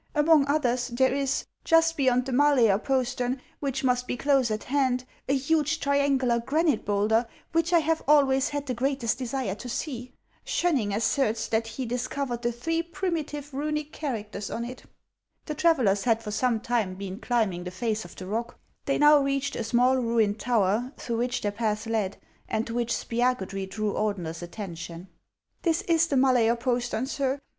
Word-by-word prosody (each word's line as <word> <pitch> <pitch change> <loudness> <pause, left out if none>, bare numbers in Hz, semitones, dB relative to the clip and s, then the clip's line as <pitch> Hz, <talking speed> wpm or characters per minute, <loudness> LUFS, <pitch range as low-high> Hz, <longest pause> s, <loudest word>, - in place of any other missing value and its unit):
Among 295 -1 +5
others, 255 -4 +1
there 260 +1 +2
is, 275 0 -1 0.2
just 330 0 +4
beyond 255 -3 +2
the 270 - -4
Malaer 250 -7 +4
postern, 255 -1 0 0.2
which 275 -2 -2
must 250 -1 +1
be - - -2
close 270 -2 +2
at 215 0 -2
hand, 260 -2 +1 0.3
a 275 - +3
huge 310 +3 +1
triangular 280 -4 +2
granite 290 +2 +1
bowlder, 210 +3 +2 0.2
which 330 +1 +1
I 345 - +6
have 325 0 +1
always 275 -2 +4
had 290 -1 -3
the 255 - -2
greatest 255 -1 -1
desire 255 -5 -2
to 245 +5 -8
see. 250 -1 -4 0.3
Schoenning 275 -13 0
asserts 225 +1 +1
that 225 0 0
he 255 +3 -5
dis 245 +1 -2
covered 255 -4 -3
the 240 0 0
three 330 +8 -1
primitive 315 -5 -4
Runic 300 +2 -2
characters 210 -8 -4
on 235 - -3
it." 250 +1 -8 0.6
The 305 - -3
travellers 265 - +2
had 230 -2 +2
for 210 - -5
some 230 0 +1
time 225 -6 -1
been 195 +1 -6
climbing 220 -9 0
the - - -3
face 220 +3 -2
of 175 - -12
the 185 - -8
rock; 230 +5 -3 0.3
they 275 - +1
now 295 0 +7
reached 275 0 -1
a - - -2
small, 245 +3 +3
ruined 230 -4 +1
tower, 235 +2 +1
through 235 -2 -3
which 245 +1 -1
their 205 - -1
path 215 0 -2
led, 220 -4 -1 0.3
and 220 +1 0
to 230 - -6
which 235 -1 -1
Spiagudry 200 -7 -1
drew 210 +1 -2
Ordener's 180 -6 -2
attention. 175 -1 -7 0.2
" - - -50
This 330 -1 +1
is 335 -1 +3
the 280 - 0
Mala'er 250 -3 +4
postern, 245 0 -1
sir. 275 0 -1
250 Hz, 180 wpm, -27 LUFS, 220-280 Hz, 0.6 s, now